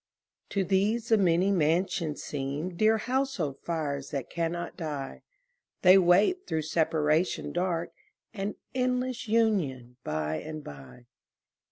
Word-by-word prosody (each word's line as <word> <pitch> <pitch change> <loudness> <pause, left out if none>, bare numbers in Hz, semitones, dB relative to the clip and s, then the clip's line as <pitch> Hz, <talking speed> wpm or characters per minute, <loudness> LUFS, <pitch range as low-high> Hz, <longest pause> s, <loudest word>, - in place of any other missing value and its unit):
To 195 - 0
these 205 +5 +1
the 225 - +5
many 180 +1 +3
mansions 165 -2 0
seem 145 +5 -4
Dear 220 +4 +4
household 245 - -1
fires 145 -5 -3
that 140 -4 -4
cannot 170 0 -3
die; 150 -6 -5 0.6
They 185 +1 +8
wait 200 - +3
through 160 -1 -1
separation 155 +1 +1
dark 175 -1 -1 0.4
An 200 -1 -3 0.2
endless 255 -1 -1
union 170 - +1
by 75 0 -2
and 155 - -7
by. 70 - -11
170 Hz, 120 wpm, -28 LUFS, 150-205 Hz, 0.6 s, They